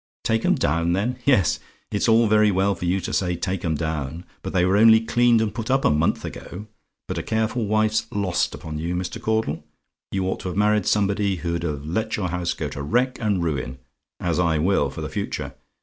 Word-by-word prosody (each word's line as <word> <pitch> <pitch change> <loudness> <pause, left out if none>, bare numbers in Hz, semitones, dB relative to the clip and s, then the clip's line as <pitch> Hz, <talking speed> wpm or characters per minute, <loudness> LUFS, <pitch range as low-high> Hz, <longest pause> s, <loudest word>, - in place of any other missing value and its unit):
"TAKE 115 0 0
'EM - - +4
DOWN, 85 +3 +1
THEN? 120 +7 -1
"Yes, 110 - +3 0.3
it's 105 +3 +1
all 115 +1 +5
very 105 0 +4
well 95 +1 +2
for 90 - -5
you 90 +2 +1
to - - -4
say 90 -2 0
take 95 +2 -3
'em 80 -2 0
down; 80 +1 -3 0.2
but - - -5
they 90 -1 +2
were 95 +2 +2
only 110 +1 +7
cleaned 120 0 +3
and 105 -3 -1
put 115 +1 -5
up 135 +1 +2
a - - +5
month 75 +2 +1
ago; 100 +5 -8 0.4
but - - -3
a - - -2
careful 110 0 -1
wife's 110 +1 +1
lost 100 -3 0
upon 75 -1 -6
you, 85 +3 -2
Mr. 90 0 -4
Caudle. 110 -9 -1 0.5
You 95 -1 -1
ought 95 - -2
to - - -6
have 90 - -4
married 105 -1 +2
somebody 100 -1 +1
who'd 85 -1 -3
have 75 -4 -3
let 110 +8 -2
your 95 -4 -2
house 90 0 -2
go - - -3
to 70 - -6
wreck 125 - 0
and 100 -5 +1
ruin, 65 -5 -2 0.4
as 85 -1 -1
I 85 -3 +2
will 80 -3 +2
for - - -7
the - - -3
future. - - -4
95 Hz, 220 wpm, -23 LUFS, 85-110 Hz, 0.5 s, only